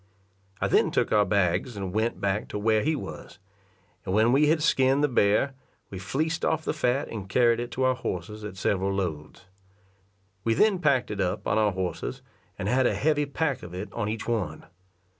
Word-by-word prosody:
I - - +1
then - - +3
took - - 0
our 105 -1 +4
bags, 100 +3 0
and 95 -2 -4
went 110 +2 0
back 100 +1 -1
to - - -5
where 110 +1 +2
he 155 +5 +1
was; - - -8 0.7
and 95 0 -2
when 110 +2 +4
we 145 +3 +4
had 155 0 +2
skin'd 135 -1 +3
the - - +5
bear, 120 +2 +2 0.4
we 95 - -6
fleeced 155 - -2
off 160 0 0
the - - 0
fat 140 -2 0
and 100 -4 -7
carried 120 +1 +3
it 120 0 -4
to 130 - -1
our 130 0 +4
horses 105 -2 -5
at 105 -2 -7
several 95 0 0
loads. 85 -2 -4 1.0
We 115 0 +1
then 210 - +3
packed 140 -10 +2
it 100 -2 -2
up 90 -1 -2
on 105 - +2
our 105 -2 +2
horses, 95 -1 -4 0.3
and 100 - -3
had 125 +3 +3
a - - 0
heavy 150 -1 +1
pack 140 -2 -1
of 90 0 -9
it 95 +1 -6
on 105 -3 -2
each 110 0 -4
one. 100 -10 -2
110 Hz, 200 wpm, -26 LUFS, 100-135 Hz, 1.0 s, the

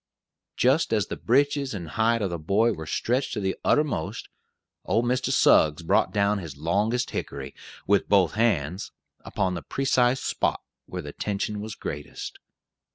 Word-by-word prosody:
Just 135 +4 +3
as 105 -3 +2
the - - -5
breeches 140 0 +1
and 85 -5 -6
hide 110 +6 +1
of 95 - -1
the 85 - -3
boy 105 +9 +2
were 80 -3 -8
stretched 125 - -1
to 110 - -2
the 95 -1 -1
uttermost, 145 - 0 0.5
old 115 +6 +1
Mr. 125 +1 0
Suggs 75 +2 +4
brought - - +2
down 100 0 +1
his 80 -7 -8
longest 105 - 0
hickory, 70 0 -5 0.3
with 100 0 +2
both 95 -4 +4
hands, 100 -6 0 0.3
upon 95 -1 -1
the 85 - -4
precise 130 -1 +1
spot - - -1 0.2
where 90 -1 -5
the 75 - -8
tension 105 +1 -3
was 110 0 -6
greatest. 75 0 -7
105 Hz, 160 wpm, -26 LUFS, 85-120 Hz, 0.5 s, Suggs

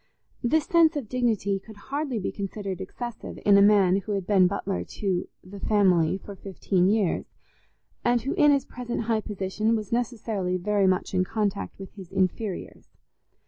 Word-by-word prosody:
This 300 +6 +2
sense 335 -3 +4
of 280 -6 -3
dignity 220 -5 0
could 220 +2 -14
hardly 275 +3 -3
be 200 - -2
considered 195 -2 -5
excessive 240 -2 -7
in 205 - +6
a 200 - +7
man 200 -2 +5
who 200 +2 -3
had 195 -2 -2
been 190 -3 +5
butler 195 0 -2
to 190 -4 -2 0.2
"the 195 +2 -10
family" 190 -5 +3
for 200 0 -10
fifteen 185 -1 0
years, 205 -4 +1 0.8
and 240 0 +3
who, 270 +6 -2
in 300 -5 +5
his 280 -1 +2
present 240 -1 -4
high 225 -1 0
position, 210 +2 -1
was 215 -3 -4
necessarily 220 -6 -1
very 200 +1 +1
much 185 +1 0
in 185 -1 +3
contact 210 0 -2
with 195 -1 -9
his 190 -4 -11
inferiors. 190 +1 -2
205 Hz, 170 wpm, -26 LUFS, 190-235 Hz, 0.8 s, a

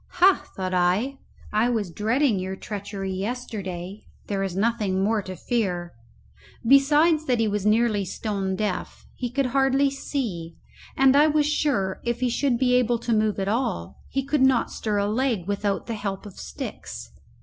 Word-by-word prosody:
Ha, 365 +2 +5
thought 185 -1 -3
I, 190 +10 +1 0.3
I 220 +3 +3
was 215 -7 -1
dreading 225 - +1
your 190 +1 -4
treachery 200 -1 -5
yesterday; 195 -3 -5 0.2
there 200 -1 -2
is 190 -2 -2
nothing 205 -3 +1
more 215 +1 +2
to 185 -1 -7
fear. 180 -7 -2 0.7
Besides 300 +4 +5
that 250 -4 +1
he 225 - +2
was 205 0 -1
nearly 215 -1 +3
stone 195 0 -3
deaf, 205 -2 -3
he 245 - -4
could 275 +3 0
hardly 270 0 +3
see; 210 - -4 0.4
and 270 0 +5
I 295 +2 +6
was 300 -1 +2
sure, 275 -11 0
if 235 0 -1
he 250 0 +1
should 245 0 +1
be 250 0 +2
able 245 -1 +3
to 235 0 -1
move 215 -1 +1
at 195 - -1
all, 200 - -2
he 270 -1 -2
could 285 0 +1
not 265 -2 +3
stir 210 -2 -2
a 200 - +1
leg 225 -3 0
without 200 0 -1
the 230 - -4
help 200 -2 -4
of 205 - -9
sticks. - - -7
220 Hz, 170 wpm, -25 LUFS, 195-260 Hz, 0.7 s, I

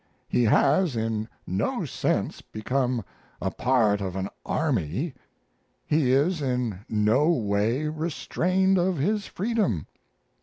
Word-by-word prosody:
He 120 - +2
has 140 - +3
in 110 -1 -2 0.2
no 95 +2 -1
sense - - -1
become 125 0 -2 0.3
a - - -2
part 110 -5 +2
of 95 -2 -3
an 95 +1 -2
army; 135 - -1 0.7
he 150 -4 +2
is 150 +5 +2
in 125 -7 -1
no 110 +8 +3
way 115 -2 +1
restrained 180 +4 +1
of 180 0 +1
his 205 +8 0
freedom. 200 - -1
130 Hz, 115 wpm, -26 LUFS, 110-165 Hz, 0.7 s, has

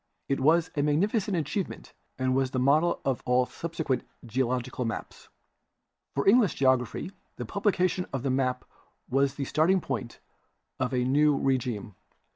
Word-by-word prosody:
I\ - - +5
was 160 +6 +3
a. 145 - +1
magnificent 190 +7 +1
achievement 160 +5 -4 0.2
and 130 -1 +1
was 135 0 +1
the 130 - -4
model 150 +6 +3
of 135 -2 0
all 125 0 +3
subsequent 160 -3 -3 0.2
geological 125 +1 -1
maps. 115 - -6 0.9
For 140 - 0
English 215 -2 +5
Geology, 130 +5 +1 0.2
the - - -5
publication 185 -3 0
of 135 -2 -3
the 135 - 0
map 130 -1 0 0.5
was 135 +1 +2
the 140 - -3
starting 170 +7 +3
point 120 - -5 0.6
of 130 0 0
a 125 -1 +1
new 145 +3 +3
regime. 125 -6 -1
135 Hz, 145 wpm, -28 LUFS, 130-165 Hz, 0.9 s, I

